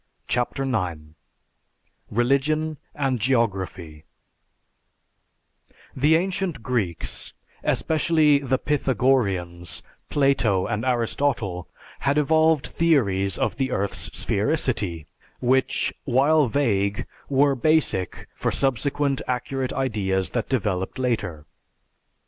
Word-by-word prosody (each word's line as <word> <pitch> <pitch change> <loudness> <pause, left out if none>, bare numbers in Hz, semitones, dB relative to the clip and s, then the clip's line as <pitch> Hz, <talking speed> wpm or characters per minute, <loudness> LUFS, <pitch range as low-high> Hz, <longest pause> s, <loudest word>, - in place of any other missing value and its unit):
CHAPTER 125 +2 -1
IX 90 -12 -2 1.0
RELIGION 140 +6 +1 0.2
AND 135 -4 0
GEOGRAPHY 95 - -1 1.9
The 150 +4 +4
ancient 180 - -1
Greeks, 110 -10 -3 0.3
especially 155 -2 +3
the 130 -2 0
Pythagoreans, 100 - 0 0.3
Plato, 125 -10 +2
and 105 +1 -2
Aristotle, 120 - -1 0.3
had 140 +1 +1
evolved 160 0 +3
theories 100 - +1
of 110 +1 -1
the 135 -1 0
earth's 100 +1 -2
sphericity, 105 - 0 0.3
which, 130 +1 +1
while 140 +3 +4
vague, 105 -6 0 0.2
were 140 +1 +4
basic 135 - +1
for - - -1
subsequent 140 +1 0
accurate 130 +1 -2
ideas 100 -8 -1
that 120 - -2
developed 100 -5 -1
later. 105 -12 -2
125 Hz, 90 wpm, -24 LUFS, 100-140 Hz, 1.9 s, The